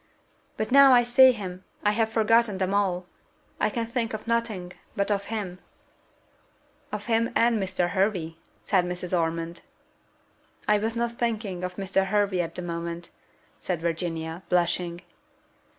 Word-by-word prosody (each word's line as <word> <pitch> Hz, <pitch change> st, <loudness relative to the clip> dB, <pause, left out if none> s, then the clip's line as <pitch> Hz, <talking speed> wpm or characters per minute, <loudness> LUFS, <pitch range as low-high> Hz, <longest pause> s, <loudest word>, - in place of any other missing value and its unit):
"But 215 Hz, -, -2 dB
now 275 Hz, 0 st, +8 dB
I 245 Hz, -1 st, +6 dB
see 255 Hz, +2 st, +7 dB
him, 185 Hz, -5 st, -6 dB, 0.2 s
I 210 Hz, -, +4 dB
have 220 Hz, +1 st, +1 dB
forgotten 225 Hz, -1 st, +3 dB
them 190 Hz, 0 st, -1 dB
all. 190 Hz, -3 st, +1 dB, 0.5 s
I -, -, +2 dB
can 235 Hz, -2 st, -2 dB
think 230 Hz, -1 st, -2 dB
of 215 Hz, -, -8 dB
nothing 220 Hz, -6 st, -1 dB, 0.2 s
but 200 Hz, +1 st, 0 dB
of 200 Hz, -1 st, 0 dB
him." 200 Hz, -5 st, -4 dB, 1.3 s
"Of 210 Hz, -1 st, -4 dB
him 230 Hz, 0 st, +1 dB
and 230 Hz, -2 st, +3 dB
Mr. 185 Hz, -2 st, -1 dB
Hervey," 185 Hz, -5 st, 0 dB, 0.3 s
said 190 Hz, -3 st, +2 dB
Mrs. 180 Hz, 0 st, -3 dB
Ormond. 165 Hz, 0 st, -1 dB, 1.1 s
"I 210 Hz, 0 st, +4 dB
was 225 Hz, +2 st, -2 dB
not 235 Hz, 0 st, -2 dB
thinking 215 Hz, -6 st, -2 dB
of 180 Hz, 0 st, -4 dB
Mr. 195 Hz, 0 st, 0 dB
Hervey 200 Hz, -2 st, +1 dB
at 165 Hz, -1 st, -5 dB
that -, -, -4 dB
moment," 170 Hz, 0 st, -5 dB, 0.5 s
said 180 Hz, -3 st, -2 dB
Virginia, 165 Hz, 0 st, -3 dB
blushing. 175 Hz, 0 st, 0 dB
195 Hz, 150 wpm, -26 LUFS, 175-225 Hz, 1.3 s, now